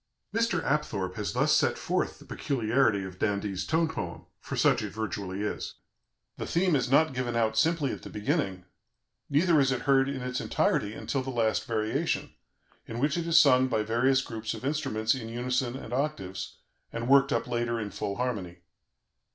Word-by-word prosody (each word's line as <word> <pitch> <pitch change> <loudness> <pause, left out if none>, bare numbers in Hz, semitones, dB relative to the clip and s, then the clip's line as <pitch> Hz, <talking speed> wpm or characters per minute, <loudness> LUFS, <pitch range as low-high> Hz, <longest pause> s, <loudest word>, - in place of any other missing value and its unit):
" - - -46
Mr. 230 -8 +1
Apthorp 100 -11 -1
has 100 -2 -3
thus - - +2
set - - +3
forth - - -1
the - - -15
peculiarity 115 -4 +1
of 95 -1 -8
d'Indy's 100 -2 -1
tone 165 +1 +2
poem 160 - -5
(for - - -6
such - - +3
it - - -3
virtually 100 -3 -4
is): 105 - -4 0.6
"The - - -4
theme 175 -1 +2
is 130 -3 0
not 150 +2 +4
given 125 -2 -2
out 110 -1 +1
simply 160 -4 +2
at - - -6
the - - -9
beginning, 95 -3 -1 0.6
neither 155 +2 +4
is 135 -1 +3
it 130 - -1
heard 135 -1 +3
in 135 -2 -4
its 125 0 -2
entirety 105 +1 +1
until 135 - -2
the 130 - -5
last 115 -3 0
variation, 110 -1 -1 0.5
in 115 - -6
which 140 +4 +1
it 170 -1 -2
is 165 - +4
sung 130 -2 +6
by 110 -4 0
various 130 +5 +2
groups 110 -3 -4
of - - -8
instruments 110 -7 0
in 115 -4 -5
unison 125 +1 -1
and 120 -3 -8
octaves, 125 -10 -3 0.4
and 115 +1 -4
worked 135 +1 +5
up - - +1
later 120 -1 -1
in 105 -2 -4
full 100 +1 -3
harmony. 105 -8 -3
120 Hz, 185 wpm, -28 LUFS, 110-140 Hz, 0.6 s, sung